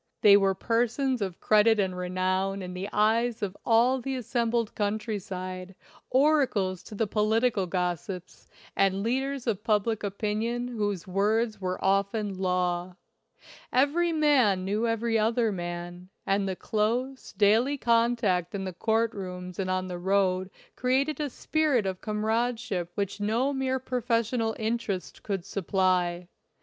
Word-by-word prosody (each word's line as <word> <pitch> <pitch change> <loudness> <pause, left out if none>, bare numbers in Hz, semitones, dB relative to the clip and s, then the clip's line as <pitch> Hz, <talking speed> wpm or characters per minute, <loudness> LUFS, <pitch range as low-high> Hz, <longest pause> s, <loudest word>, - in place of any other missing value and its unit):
They 205 -1 +8
were 195 -1 +3
persons 240 +4 0
of 190 -3 -3
credit 215 +1 +4
and 190 -2 0
renown 185 +2 -1
in 180 0 -6
the 185 +3 -5
eyes 220 +2 +1
of 195 -1 -3
all 245 +3 +3
the 270 +1 -3
assembled 235 -2 -1
coun 205 0 0
try 215 -1 -4
side, 185 0 -6 0.3
oracles 255 - +2
to 215 - -9
the 225 - +1
political 215 -1 +1
gossips, 180 0 -4 0.3
and 195 0 +2
leaders 265 +3 -1
of 210 -4 -1
public 220 0 +1
opinion 220 +4 -2
whose 205 -6 -2
words 210 +3 0
were 185 0 -2
often 200 0 0
law. 180 -1 -1 0.8
Every 295 +7 +2
man 265 - +3
knew 210 +4 0
every 225 0 +1
other 225 +1 +2
man, 175 0 -6 0.2
and 195 0 +1
the 190 - -2
close, 240 +7 -2
daily 220 +8 +3
contact 230 -7 +1
in 195 - -3
the 185 -1 -4
court 225 +5 +1
rooms 180 -2 -7
and 185 -1 -1
on 185 0 -1
the 180 -1 -5
road 185 0 +1 0.3
created 270 +5 +1
a 295 -1 -1
spirit 290 -5 +1
of 190 -1 -3
comradeship 220 -3 -1
which 200 0 -2
no 235 +7 +1
mere 265 -1 0
professional 235 -3 -1
interest 220 -4 -3
could 195 -4 -3
supply. 185 -2 0
210 Hz, 140 wpm, -27 LUFS, 185-235 Hz, 0.8 s, They